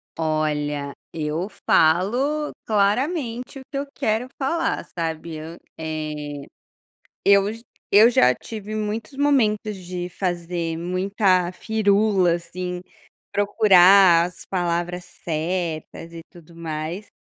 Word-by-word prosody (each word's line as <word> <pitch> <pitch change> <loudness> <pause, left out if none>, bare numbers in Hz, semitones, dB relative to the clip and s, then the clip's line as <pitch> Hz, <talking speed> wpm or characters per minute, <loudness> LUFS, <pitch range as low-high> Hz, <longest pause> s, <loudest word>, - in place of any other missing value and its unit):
Olha, 150 -3 -1 0.2
eu 160 +3 -2 0.2
falo 245 - +3
claramente 245 - 0
o - - -11
que 275 - -3
eu 280 - -2
quero 220 +3 -1
falar, 330 +4 -1
sabe. 160 -1 -4
Hã, 165 +2 -8 0.2
eh, 150 -2 -5 0.8
eu 200 0 +5
j 230 +1 -11 0.3
eu 215 +3 +9
já 125 - +4
tive 215 - -8
muitos 215 +4 -4
momentos 220 -7 +2
de 180 -1 -5
fazer 175 -2 -3
muita 185 0 +1
firula 205 -4 +2
assim, 180 +1 -6 0.5
procurar 195 -4 +6
as 180 0 -11
palavras 175 -1 -2
certas 165 0 -4
e 165 -1 -9
tudo 170 -2 -16
mais, 165 +4 -5
180 Hz, 110 wpm, -23 LUFS, 165-215 Hz, 0.8 s, eu